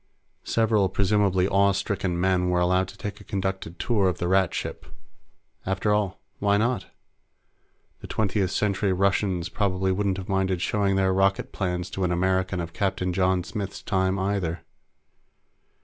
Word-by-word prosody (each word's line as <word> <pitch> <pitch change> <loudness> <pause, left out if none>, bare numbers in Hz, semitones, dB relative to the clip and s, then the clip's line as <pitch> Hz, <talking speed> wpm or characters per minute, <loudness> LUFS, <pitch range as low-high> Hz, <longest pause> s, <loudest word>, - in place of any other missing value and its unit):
Several 110 -4 +2
presumably 95 -1 +2
awe 100 0 +3
stricken 95 -2 -2
men 90 0 +2
were 90 0 +2
allowed 90 +1 +2
to - - -12
take 105 0 -6
a - - -11
conducted 95 -3 -3
tour 100 -4 +2
of 90 - -3
the 85 - -2
Rat 95 -1 +3
ship. - - -5 0.8
After 95 +2 0
all, 105 -3 0 0.2
why 100 0 +3
not? 120 +4 0 1.1
The - - -9
Twentieth 100 -3 0
Century 100 0 0
Russians 95 -2 +1
probably 95 -2 0
wouldn't 95 0 0
have 95 - -6
minded 95 -2 0
showing 100 +1 +1
their 95 -1 +2
rocket 95 +1 +1
plants 90 -1 -3
to 95 - -3
an 90 - +1
American 95 +1 +1
of 85 0 -5
Captain 95 -3 -1
John 90 0 +2
Smith's 100 +1 -5
time, 95 -1 +1
either. 95 -4 -1
95 Hz, 155 wpm, -25 LUFS, 90-100 Hz, 1.1 s, awe